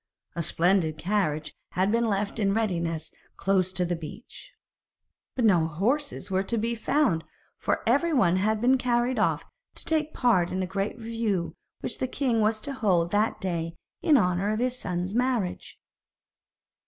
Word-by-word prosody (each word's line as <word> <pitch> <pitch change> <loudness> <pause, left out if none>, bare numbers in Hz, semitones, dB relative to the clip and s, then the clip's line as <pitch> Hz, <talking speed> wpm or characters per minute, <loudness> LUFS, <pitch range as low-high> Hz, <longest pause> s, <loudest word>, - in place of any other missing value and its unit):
A 170 - -1
splendid 165 -1 +2
carriage 155 -5 -1 0.2
had 190 +3 +2
been 230 +1 +2
left 205 +1 -1
in 200 -1 +2
readiness 170 -7 -1 0.3
close 190 -2 +1
to 180 -1 0
the 175 0 -1
beach, 170 - -10 0.8
but 245 - +1
no 175 -6 +4
horses 205 - -1
were 190 0 +2
to 230 +4 -2
be 230 +2 0
found, 230 - +1 0.4
for - - -1
every 285 +9 +3
one 190 - +3
had 215 +3 +1
been 255 +3 +3
carried 245 0 +1
off - - +1 0.3
to - - -8
take 310 -1 0
part 195 - +2
in 185 0 -1
a - - 0
great 195 +2 -3
review 225 -6 -2 0.3
which - - -4
the 260 - 0
king 245 -4 0
was 215 +1 +2
to 280 - -5
hold 180 -9 +1
that 210 +2 +1
day 165 -3 -3 0.3
in 305 -4 +5
honour 180 -2 +1
of 215 - 0
his 250 +2 0
son's 180 -4 -3
marriage. 240 -6 -1
205 Hz, 165 wpm, -27 LUFS, 180-240 Hz, 0.8 s, in